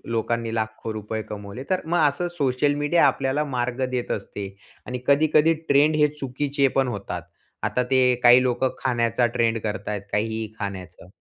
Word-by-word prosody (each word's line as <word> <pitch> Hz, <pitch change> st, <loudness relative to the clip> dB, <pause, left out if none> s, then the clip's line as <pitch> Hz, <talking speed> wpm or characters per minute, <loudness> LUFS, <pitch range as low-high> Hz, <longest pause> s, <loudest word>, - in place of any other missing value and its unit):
लोकांनी 115 Hz, 0 st, -1 dB
लाखो 110 Hz, 0 st, -3 dB
रुपये 110 Hz, +1 st, -4 dB
कमवले. 105 Hz, +4 st, -8 dB
तर 185 Hz, -1 st, +1 dB
मग 170 Hz, +2 st, 0 dB
असं 160 Hz, +5 st, -1 dB
सोशल 140 Hz, 0 st, +1 dB
मीडिया 145 Hz, +3 st, +3 dB
आपल्याला 135 Hz, +2 st, 0 dB
मार्ग 125 Hz, +1 st, -1 dB
देत 125 Hz, -1 st, -3 dB
असते 100 Hz, 0 st, -4 dB, 0.4 s
आणि 125 Hz, -, -4 dB
कधी-कधी 155 Hz, +2 st, +4 dB, 0.2 s
ट्रेंड 145 Hz, +2 st, +4 dB
हे 150 Hz, -1 st, +4 dB
चुकीचे 140 Hz, 0 st, -1 dB
पण 135 Hz, -1 st, +3 dB
होतात. 100 Hz, -6 st, -4 dB, 0.4 s
आता 125 Hz, -, 0 dB
ते 130 Hz, -1 st, +4 dB
काही 120 Hz, +1 st, +8 dB
लोकं 130 Hz, +1 st, +1 dB
खाण्याचा 120 Hz, -1 st, +1 dB
ट्रेंड 115 Hz, -1 st, +1 dB
करतायेत, 105 Hz, -1 st, -4 dB
काहीही 110 Hz, +1 st, -1 dB
खाण्याचं. 95 Hz, -4 st, -7 dB
125 Hz, 155 wpm, -24 LUFS, 110-140 Hz, 0.4 s, काही